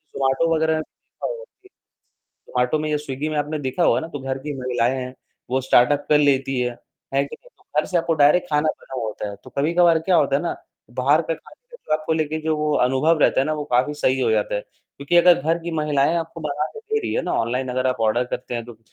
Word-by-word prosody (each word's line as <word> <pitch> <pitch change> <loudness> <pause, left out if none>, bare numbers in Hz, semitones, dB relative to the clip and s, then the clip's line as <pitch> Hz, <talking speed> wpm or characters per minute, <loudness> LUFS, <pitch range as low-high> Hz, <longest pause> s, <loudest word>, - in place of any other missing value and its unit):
जोमाटो 135 +5 +1
वग़ैरह 160 0 +2
में 155 - 0
देखा - - -12
होगा - - -6 0.2
कि 380 - -19 0.6
जोमाटो 125 +4 -1
में 155 0 -2
या 150 - +2
स्विग्गी 145 0 -4
में 155 - -3
आपने 150 +1 -2
देखा 140 +5 -2
होगा - - +4
ना 160 - -6
तो 145 - -6
घर 135 0 -3
की 145 +2 -5
महिलाएँ 125 0 0
हैं, 130 0 -5 0.4
वो 130 +1 +1
स्टार्टअप 140 +3 +3
कर 150 - +5
लेती 135 -2 +2
हैं, 125 0 0 0.4
है 140 +1 +3
कि - - -9
नहीं? - - -20
तो - - -27 0.2
घर - - -7
से 180 - -1
आपको 165 0 0
डायरेक्ट 150 +4 +4
खाना 150 +1 +2
बना 135 - -6
हुआ 120 -3 -2
होता 105 -1 -5
है। 100 - -9
तो - - -12
कभी-कभार 165 +3 +3
क्या 175 +2 +2
होता 140 -3 +3
है 145 - -2
ना 170 - -2 0.4
बाहर 140 +6 +2
का 165 - -2
खाने - - -18
का 485 - -11
जो - - -2
आपको 155 +1 -3
लेके 155 0 -1
जो 160 -1 0
वो 150 0 0
अनुभव 135 +6 +2
रहता - - +4
है 135 - +1
ना 155 - 0
वो 150 - -4
काफ़ी 130 +4 +2
सही 130 -2 +1
हो 120 -3 +2
जाता 105 -1 +1
है, 105 - 0
क्योंकि 140 +10 -5
अगर 175 -2 +6
घर 165 +2 +1
की 170 - -4
महिलाएँ 150 +1 +1
आपको 165 0 -4
बनाके 150 - -3
दे 440 -1 -2
रही - - -3
है - - 0
ना - - -2
ऑनलाइन 125 +3 -2
अगर 130 +1 -1
आप 130 -2 -1
आर्डर 115 +3 +2
करते 125 -1 -4
हैं, 115 - -3
तो 115 -2 -12
145 Hz, 255 wpm, -22 LUFS, 130-160 Hz, 0.6 s, अगर